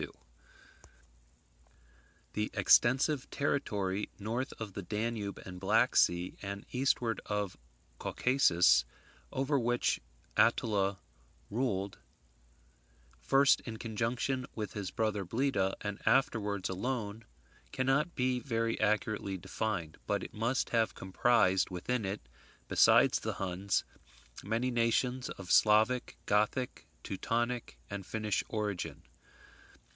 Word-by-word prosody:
] - - -18
The 105 0 -1
extensive 135 +3 +4
territory 105 -8 -1
north 115 +6 -3
of 110 -3 -6
the 100 - -5
Danube 105 +1 -3
and 90 -1 -8
Black 95 - +3
sea, 85 +1 +2
and 100 0 -6
eastward 125 -3 +1
of 105 -2 -2 0.4
Caucasus, 90 - +4 0.5
over 135 +2 +1
which 120 0 +1 0.4
Attila 100 -3 +2 0.5
ruled, 100 -4 -1 1.2
first 135 - +4
in 115 -2 -7
conjunction 120 +4 -2
with 105 -2 -4
his 100 -3 -4
brother 105 0 -1
Bleda, 105 -1 0
and 105 -1 -4
afterwards 105 -7 +2
alone, 110 +1 -3 0.5
cannot 135 +6 +1
be 125 0 +1
very 115 -3 -1
accurately 105 -2 0
defined; 90 -3 -3
but - - 0
it - - -8
must 115 +4 -1
have 115 -2 +1
comprised 95 -1 +2
within 105 +5 -2
it, 95 +1 -3 0.5
besides - - +5
the - - -3
Huns, 95 +1 -1 0.6
many 115 +5 -1
nations 125 +2 +1
of 95 -2 -7
Slavic, 110 +4 +4
Gothic, 105 +5 0 0.2
Teutonic, 120 +4 -2
and 100 -1 -4
Finnish 105 0 -1
origin. 105 -4 -3
110 Hz, 105 wpm, -32 LUFS, 95-120 Hz, 1.2 s, besides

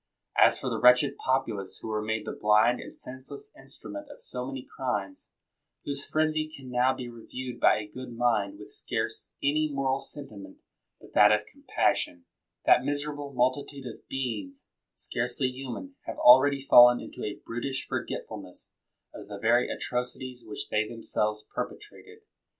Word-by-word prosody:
As - - +6
for - - -5
the - - -1
wretched 125 +3 +6
populace 115 -8 -1
who - - -8
were 105 -1 -1
made 110 0 -2
the - - -3
blind 110 +3 +3
and - - -10
senseless 130 - -7
instrument 300 -1 -10
of 290 - -12
so 125 0 -5
many 135 -1 -5
crimes, 105 -7 -3 0.6
whose 140 -1 -3
frenzy 155 0 0
can 135 -4 -11
now 125 +1 +3
be 130 -2 -5
reviewed 120 +1 -7
by - - +6
a 105 - -4
good 130 +3 -8
mind 105 -5 +1
with 105 - -9
scarce 115 -1 -2
any 150 +2 +2
moral 135 -1 0
sentiment 135 -7 -8 0.4
but - - -16
that 105 0 +7
of 105 0 +2
compassion; 90 -1 -1 0.4
that - - +6
miserable 145 0 -3
multi 130 +2 +2
tude 140 -2 -10
of 120 - -9
beings, 110 -9 -4 0.3
scarcely 125 +2 -1
human, 135 - -7
have - - -5
already 135 +2 +6
fallen 120 0 +9
into - - -8
a 105 - -3
brutish 130 +3 -3
forgetfulness - - -6 0.4
of - - -10
the 100 -1 -7
very 115 +4 +3
atrocities 125 0 -3
which 105 -2 -6
they 105 0 +1
themselves 105 -2 -2
perpetrated. 425 +1 -7
125 Hz, 155 wpm, -28 LUFS, 110-135 Hz, 0.6 s, fallen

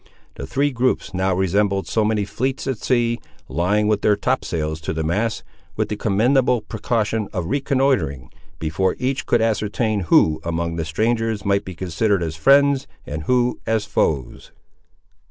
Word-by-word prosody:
The - - -7
three 145 +1 +1
groups 125 -4 0
now 95 0 +1
resembled 95 +1 +1
so 110 - 0
many 105 -1 +1
fleets 130 +6 -2
at 130 -5 -2
sea, 120 -2 +1 0.3
lying 90 +9 +1
with 105 -1 +1
their 105 - +4
topsails 80 -5 -2
to 80 - -3
the 80 0 -2
masts, 105 +7 -1 0.3
with - - -1
the 105 - -2
commendable 120 +4 +2
precaution 110 0 -1
of 90 -5 -3
reconnoitring, 130 - 0 0.3
before 80 +4 0
each 130 +1 -2
could 120 - +3
ascertain 110 0 0
who 80 0 +4
among 85 0 -2
the 80 - -2
strangers 110 +5 -1
might 100 0 +1
be 95 - -7
considered 95 +2 0
as 80 -1 -3
friends, 140 - +4 0.2
and 75 +1 -5
who 125 -1 +1
as 110 -2 +1
foes. 70 -5 -1
105 Hz, 155 wpm, -21 LUFS, 85-120 Hz, 0.3 s, their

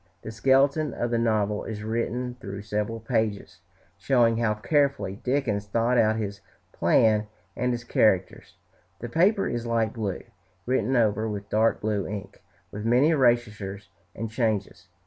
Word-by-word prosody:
The 110 - -6
skeleton 135 +5 +2
of 120 0 -2
the 115 - +1
novel 105 -2 0
is 105 -2 -6
written 120 +3 -2
through 100 +1 -7
several 105 +2 -3
pages, 110 -5 -2 0.4
showing 120 -3 +3
how 110 -2 +1
carefully 140 -4 0
Dickens 120 -6 -1
thought 115 +4 +1
out 110 0 +3
his 100 -2 -4 0.3
plan 110 -1 +3 0.3
and 125 +1 0
his 120 -1 -3
characters; 95 -5 +1 0.4
the 120 - -6
paper 190 - +2
is 120 0 -3
light 115 -2 0
blue, 105 -5 -4 0.4
written 130 0 0
over 110 -2 +2
with 100 -1 -6
dark 110 +1 +2
blue 105 -3 -1
ink, 100 -1 -7 0.3
with 105 - -6
many 125 +6 +4
erasures 110 - 0 0.3
and 115 0 -5
changes. 110 -6 -2
110 Hz, 145 wpm, -26 LUFS, 105-120 Hz, 0.4 s, many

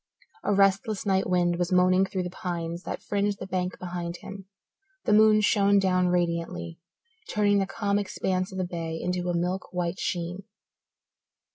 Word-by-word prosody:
A - - 0
restless 195 +2 +2
night 190 -2 +1
wind 175 -1 +2
was 175 +1 -1
moaning 185 +1 +4
through 190 -1 -2
the 180 - -5
pines 170 -2 -4
that - - -5
fringed 205 0 0
the - - -6
bank 185 -1 -2
behind 175 -1 -5
him; 195 -1 -10 0.6
the 210 - +3
moon 215 0 +6
shone 200 -1 +4
down 185 -2 +3
radiantly, 170 - -1 0.5
turning 205 -1 +3
the 195 - 0
calm 205 -1 0
expanse 185 -1 -2
of 190 - -7
the 185 - 0
bay 165 -2 -4
into 180 0 -2
a 175 - 0
milk 180 +2 -2
white 180 0 -2
sheen. 175 +2 -3
185 Hz, 165 wpm, -27 LUFS, 175-200 Hz, 0.6 s, moon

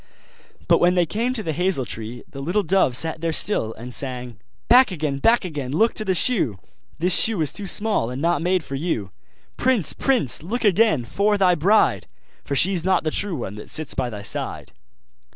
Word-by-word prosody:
But - - +4
when 180 +1 +3
they 175 -1 +3
came 230 +8 -2
to 220 - -3
the 160 - -2
hazel 175 -5 0
tree 115 +3 -6
the 135 - -9
little 180 +9 0
dove 175 -8 +3
sat 160 +1 +2
there 165 -1 -1
still, 155 - -1
and 125 +2 -9
sang: 125 -3 -3 0.3
'Back 250 +1 +6
again! 150 -6 -3
back 225 +6 +3
again! 145 -7 -5
look 220 +10 +2
to 215 - -3
the 190 -3 0
shoe! 175 - +1 0.4
The 180 +3 0
shoe 220 +2 +3
is 150 - 0
too 205 - -6
small, 205 - 0
and 125 +1 -5
not 170 +3 +1
made 180 0 0
for 140 - -9
you! 135 - -3 0.5
Prince! 245 - +1
prince! 255 - +1
look 220 +11 -4
again 195 - +3
for 205 - +1
thy 185 -2 +4
bride, 195 +7 +2 0.4
For 140 - -3
she's 180 +3 +3
not 185 0 +1
the 155 - -1
true 200 0 -1
one 120 -8 -5
that 105 - -10
sits 155 -2 -2
by 130 -2 -2
thy 105 -3 -8
side. - - -4
170 Hz, 205 wpm, -22 LUFS, 135-205 Hz, 0.5 s, Back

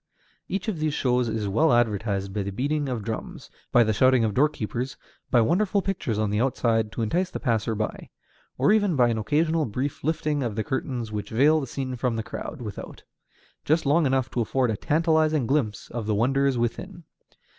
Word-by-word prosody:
Each 195 +3 -3
of 200 -7 -2
these 155 -1 0
shows 125 -2 +1
is 110 -2 -2
well 145 +11 +3
advertised 105 -4 0
by 105 - -1
the 100 - -3
beating 145 +6 -1
of 120 -4 -3
drums, 110 +1 -6 0.2
by 120 - +6
the 110 -1 +1
shouting 130 +2 +4
of 110 -2 0
doorkeepers, 130 -2 -1 0.3
by 120 - +4
wonderful 190 - +1
pictures 160 - -2
on 105 -1 0
the 105 +2 +1
outside 115 -4 +1
to 115 - -2
entice 180 - 0
the - - -5
passer 115 -3 0
by, 110 0 -4 0.5
or - - +3
even 205 -5 +3
by 125 -3 +4
an 115 -1 -1
occasional 155 +7 +1
brief 130 +6 -4
lifting 155 -1 0
of 115 -5 -2
the 110 - -1
curtains 125 -4 -3
which 105 -1 -4
veil 145 +7 +4
the 135 - -4
scene 130 0 -4
from 125 -1 -1
the 110 - -2
crowd 125 +3 -7
without, 105 -3 -8 0.6
just 160 +2 +1
long 150 +2 +3
enough 130 -1 +1
to 120 - -1
afford 125 +1 +1
a - - -1
tantalizing 155 +1 +2
glimpse 115 -5 -1
of 115 -3 -4
the 110 - +1
wonders 135 +4 +2
within. 170 - -3
125 Hz, 200 wpm, -25 LUFS, 110-150 Hz, 0.6 s, by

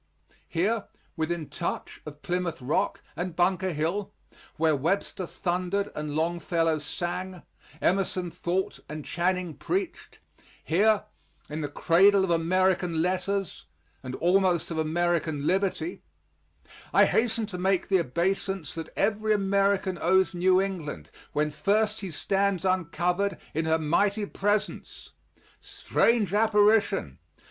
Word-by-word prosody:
Here 200 +6 0 0.3
within 160 -1 -2
touch - - -5
of 150 0 -10
Plymouth 180 -1 -2
Rock 130 +3 -1
and 175 -1 -4
Bunker 185 +1 +1
Hill 170 +6 -2 0.5
where 160 -1 +3
Webster 180 +4 -1
thundered 185 +4 -1
and 150 -1 -4
Longfellow 165 0 0
sang, 180 +4 -4 0.4
Emerson 185 -2 +1
thought 180 +3 -2
and 150 -1 -6
Channing 180 -1 -1
preached 365 - -4 0.5
here, 205 +6 +3 0.5
in 155 +1 -3
the 145 - -2
cradle 190 +7 +4
of 190 - 0
American 175 0 +2
letters 185 - -2 0.3
and 130 -1 -6
almost 180 -1 +2
of 160 - -2
American 160 -2 0
liberty, 195 - 0 0.9
I - - +6
hasten 225 -1 +1
to 190 -4 -6
make 190 0 +1
the 190 -2 +3
obeisance 180 +3 -1
that 165 -2 -6
every 215 +1 +2
American 195 -2 +1
owes 190 0 +3
New 185 +1 +3
England 170 - -4 0.2
when 150 0 +1
first 210 +7 +1
he 195 - -5
stands 195 +3 0
uncovered 185 +2 0 0.2
in 160 +2 -1
her 160 0 +3
mighty 200 +7 +1
presence. 205 +1 -2 0.5
Strange 220 -5 +1
apparition! 210 - +3
180 Hz, 120 wpm, -27 LUFS, 165-195 Hz, 0.9 s, I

